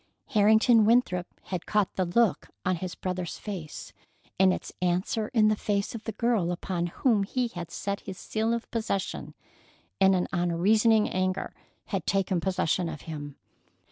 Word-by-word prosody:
Harrington 220 0 +5
Winthrop 210 -6 +3 0.2
had 180 -2 -5
caught 210 -2 +1
the 185 - +1
look 215 +4 +2 0.2
on 185 -1 +1
his 180 +1 -5
brother's 180 -2 -4
face, 180 -8 -7 0.5
and 190 -1 +6
its - - -4
answer 185 +5 0
in 215 -2 +3
the 215 - +3
face 205 -1 -1
of 225 -2 -7
the 225 - -2
girl 215 -6 +1
upon 175 0 -2
whom 215 +4 +2
he 245 +5 -1
had 175 -5 -7
set 200 +3 -3
his 190 -2 -8
seal 220 +3 -1
of 235 0 -3
possession, 220 -4 -3 0.6
and 190 0 +5
an 180 - 0
unreasoning 205 +6 +3
anger 185 0 -1 0.3
had - - -3
taken 195 -2 +1
possession 180 -2 0
of 155 -3 -7
him. 145 -3 -7
190 Hz, 160 wpm, -28 LUFS, 180-220 Hz, 0.6 s, and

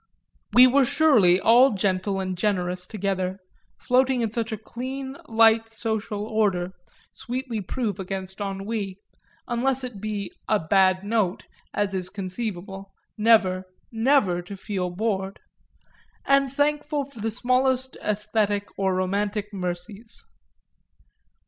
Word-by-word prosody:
We 250 +1 +8
were 270 +2 +5
surely 235 - +5
all 235 +6 +6
gentle 195 0 0
and 185 -1 -2
generous 180 -2 -1
together, 190 -2 -2 0.4
floating 255 0 +2
in 225 -2 -1
such 230 0 -2
a 220 - -2
clean 265 +5 -6
light 225 0 +4
social 220 -2 -3
order, 195 -5 0 0.4
sweetly 245 -2 -4
proof 205 0 -3
against 190 +1 -5
ennui 195 0 -3 0.5
unless 260 +2 0
it 240 -6 -7
be 210 -2 -4 0.2
a 215 - +4
bad 185 +2 +3
note, 205 -3 0 0.3
as 205 -1 -1
is 185 -1 -2
conceivable, 195 -1 -5 0.2
never, 210 -4 +3 0.3
never 225 -6 +2
to 195 +3 -9
feel 190 -2 -3
bored 195 0 -2 0.9
and 275 -1 +3
thankful 295 0 0
for 270 -4 -14
the 225 +2 -1
smallest 255 +2 +1
æsthetic 210 -1 0
or 190 -1 +1
romantic 205 +3 -1
mercies. 190 +4 -5
210 Hz, 120 wpm, -25 LUFS, 190-240 Hz, 0.9 s, We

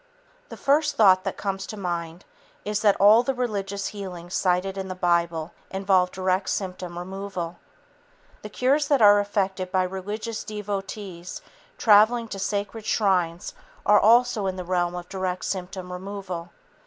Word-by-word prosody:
The - - -9
first 295 +2 +2
thought 190 -4 +5
that - - -3
comes 195 -1 -3
to 215 - -7
mind 175 -2 -4 0.4
is 210 0 -1
that 205 -2 +3
all 210 +3 +7
the 265 +2 -2
religious 200 -5 -2
healings 180 -4 -8
cited 185 +1 +1
in 190 -1 -4
the 185 - -5
Bible 170 -2 0 0.2
involve 190 -1 +2
direct 185 +1 -1
symptom 180 -2 -4
removal. 185 -1 -5 0.8
The 210 - -8
cures 270 +7 +1
that 280 -6 +3
are 205 0 +8
effected 195 -2 -1
by 185 -1 +2
religious 205 +4 -4
devotees 200 -3 -6 0.3
traveling 225 +2 +5
to 195 - -6
sacred 205 +3 -3
shrines 180 -5 0 0.3
are 210 0 +6
also 230 -2 +4
in 190 - -2
the 185 - -5
realm 175 -1 0
of 175 0 -6
direct 185 -1 -3
symptom 185 -1 -5
removal. 185 -2 -6
195 Hz, 150 wpm, -25 LUFS, 180-210 Hz, 0.8 s, are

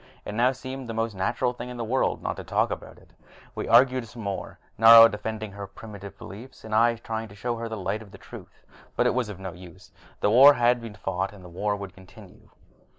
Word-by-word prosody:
It - - -6
now 120 +4 +3
seemed 130 -1 -8
the 115 - -4
most 115 -1 -1
natural 100 +6 -1
thing 120 0 -8
in 125 - -8
the 120 - -3
world 125 +4 -1
not - - -2
to - - -7
talk - - 0
about - - -7
it. - - -21 0.4
We - - -5
argued 125 0 +4
some 115 0 -10
more, 100 -1 -5 0.2
Nari 115 0 +9
defending 110 0 -5
her 100 0 -8
primitive 100 -1 -11
beliefs, 115 +5 -12
I 115 +2 +3
trying 115 -1 -5
to 100 - -15
show 120 +3 -3
her 115 0 -5
the 110 - -5
light 100 +3 -3
of 105 -3 -14
truth. - - -13 0.3
But - - +1
it - - +3
was 125 -3 -1
no 95 -2 -7
use: 90 0 -14 0.3
the 105 - +1
war 140 +5 +8
had 120 -1 +2
been 115 -2 -9
fought 95 -1 -3
and 95 -3 -14
the - - -11
war 100 +4 -2
would 100 -1 -8
continue. 95 -1 -17
110 Hz, 220 wpm, -25 LUFS, 100-120 Hz, 0.4 s, Nari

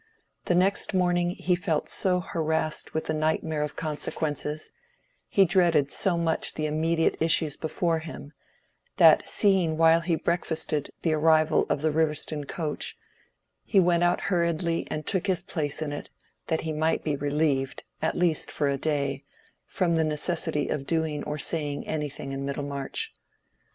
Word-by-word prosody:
The 175 - +2
next 190 +2 +1
morning 175 -1 +2
he 180 0 -1
felt 175 -4 -1
so 180 -1 +3
harassed 160 -2 -2
with 160 - -1
the 155 - -1
nightmare 155 0 0
of 150 -1 -3
consequences—he 160 - -2
dreaded 170 -6 +3
so 180 -3 +2
much 165 -1 0
the 155 - -2
immediate 160 +2 +1
issues 160 -2 +3
before 165 +1 -1
him—that 155 -2 0
seeing 185 -6 +2
while 165 0 +5
he 170 0 0
breakfasted 160 -3 -2
the 160 - +2
arrival 155 0 +3
of 145 - -1
the 155 - +2
Riverston 150 -1 0
coach, 155 -4 -4 0.7
he 200 - +3
went 175 -1 +3
out 175 - +2
hurriedly 170 -2 0
and 155 0 -4
took 190 -1 0
his 180 -3 0
place 155 -4 -3
on 145 -1 -4
it, 145 - -7 0.4
that 160 - 0
he 160 -1 -3
might 160 +1 0
be 150 -2 0
relieved, 145 -1 -1 0.2
at 160 - 0
least 175 -3 +1
for 145 - -1
a 140 0 0
day, 145 -1 -1 0.4
from 170 -3 0
the 160 - +3
necessity 155 0 -1
of 135 -2 -3
doing 160 -3 -1
or 150 0 -3
saying 150 -2 -2
anything 150 -3 -4
in 135 0 -4
Middlemarch. 140 - -3
160 Hz, 150 wpm, -26 LUFS, 150-170 Hz, 0.7 s, while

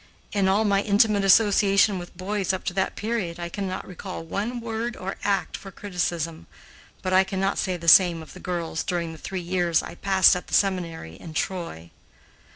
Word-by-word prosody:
In 200 -2 +1
all 200 +3 +3
my 200 -1 +3
intimate 205 0 +3
association 200 -1 +4
with 175 0 -10
boys 195 +1 -1
up 190 - -4
to - - -3
that 190 0 -1
period, 205 -6 -3
I 170 0 -4
cannot 190 0 -4
recall 185 -1 -7
one 210 +9 -3
word 230 +1 -4
or 190 +1 -5
act 200 -1 0
for 195 - -9
criticism, 170 - -3 0.6
but 185 - -1
I 190 +1 +6
cannot 195 +1 -1
say 185 -2 -1
the 170 0 -9
same 170 -1 +6
of - - -14
the - - -11
girls 170 -2 -3
during 170 -3 -2
the 160 - -11
three 190 +3 -5
years 175 -2 +1
I - - -8
passed 190 +1 +4
at 180 - -6
the 155 - 0
seminary 170 - -1
in 160 -2 -11
Troy. 165 - -4
185 Hz, 190 wpm, -25 LUFS, 170-200 Hz, 0.6 s, I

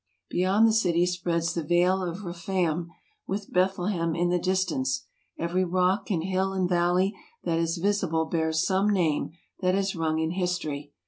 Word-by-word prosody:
Beyond 195 +5 +3
the 220 - +3
city 175 -5 +3
spreads 170 -2 -1
the 170 - -1
Vale 175 +4 +2
of 180 +2 -4
Rephaim, 170 -1 -1 0.4
with 195 +1 -4
Bethlehem 180 -2 +1
in 175 +1 +1
the 180 0 +2
distance; 190 +9 0 0.3
every 175 +2 0
rock 185 +4 +1
and 170 -6 0
hill 190 +1 0
and 185 -1 +1
valley 180 +2 +2 0.3
that 165 0 0
is 165 +1 0
visible 180 -4 +1
bears 160 0 0
some 195 +2 +2
name 175 -7 +1 0.3
that 185 -1 +2
has 195 -1 0
rung 160 -1 0
in 160 0 0
history. 175 -6 -2
180 Hz, 160 wpm, -27 LUFS, 170-190 Hz, 0.4 s, Beyond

